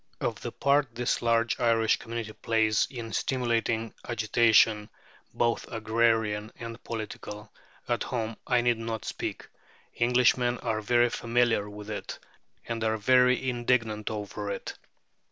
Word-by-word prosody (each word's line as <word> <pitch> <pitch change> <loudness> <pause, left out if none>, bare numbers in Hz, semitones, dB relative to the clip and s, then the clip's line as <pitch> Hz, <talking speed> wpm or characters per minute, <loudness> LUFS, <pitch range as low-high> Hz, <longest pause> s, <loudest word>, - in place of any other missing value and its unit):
Of - - -2
the - - -4
part 140 -4 +1
this 120 0 0
large 115 -1 +1
Irish 115 -2 +3
community 115 -2 -6
plays 110 -2 +1
in 115 -4 -7
stimulating 115 -3 0 0.2
agitation 110 -2 +3 0.4
both 120 -1 0
agrarian 110 -1 +1
and 115 0 -8
political 105 -1 -7 0.3
at - - 0
home 115 -3 -3
I 125 - +3
need 120 -1 +1
not 115 -2 -4
speak; - - -5 0.5
Englishmen 125 0 +3
are 110 -2 -1
very 120 +2 +3
familiar 115 -4 +1
with 105 +1 -8
it, 105 - -5 0.5
and 115 -1 -3
are 110 0 +1
very 125 +3 +4
indignant 120 -4 0
over 105 -1 -5
it. - - -5
115 Hz, 130 wpm, -28 LUFS, 110-120 Hz, 0.5 s, very